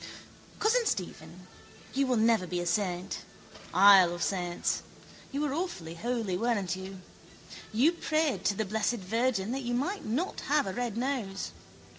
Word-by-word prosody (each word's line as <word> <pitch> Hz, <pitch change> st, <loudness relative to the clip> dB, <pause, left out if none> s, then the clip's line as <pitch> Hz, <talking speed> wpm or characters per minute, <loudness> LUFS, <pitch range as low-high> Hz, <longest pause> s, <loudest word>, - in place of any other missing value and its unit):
Cousin 455 Hz, +2 st, +2 dB
Stephen, 180 Hz, -, -4 dB, 0.5 s
you 275 Hz, 0 st, +1 dB
will 250 Hz, -2 st, +2 dB
never 220 Hz, -4 st, +3 dB
be 180 Hz, 0 st, -2 dB
a 175 Hz, -, -2 dB
saint. 180 Hz, -1 st, -1 dB, 0.5 s
Isle 190 Hz, -2 st, +7 dB
of 175 Hz, -, -3 dB
saints. 175 Hz, -3 st, -1 dB, 0.5 s
You 280 Hz, -, -2 dB
were 295 Hz, -2 st, 0 dB
awfully 285 Hz, -, -3 dB
holy, 225 Hz, 0 st, -2 dB
weren't 205 Hz, -6 st, 0 dB
you? 190 Hz, 0 st, -8 dB, 0.7 s
You 250 Hz, +9 st, +4 dB
prayed 315 Hz, -4 st, 0 dB
to 200 Hz, -, +2 dB
the 220 Hz, -, -1 dB
Blessed 220 Hz, +4 st, 0 dB
Virgin 225 Hz, +1 st, 0 dB
that 270 Hz, +2 st, -2 dB
you 240 Hz, -1 st, -2 dB
might 365 Hz, +11 st, -1 dB
not 265 Hz, -, -2 dB
have 295 Hz, 0 st, +3 dB
a 190 Hz, -, -3 dB
red 240 Hz, -2 st, -3 dB
nose. 235 Hz, -7 st, -2 dB
220 Hz, 155 wpm, -30 LUFS, 185-265 Hz, 0.7 s, Isle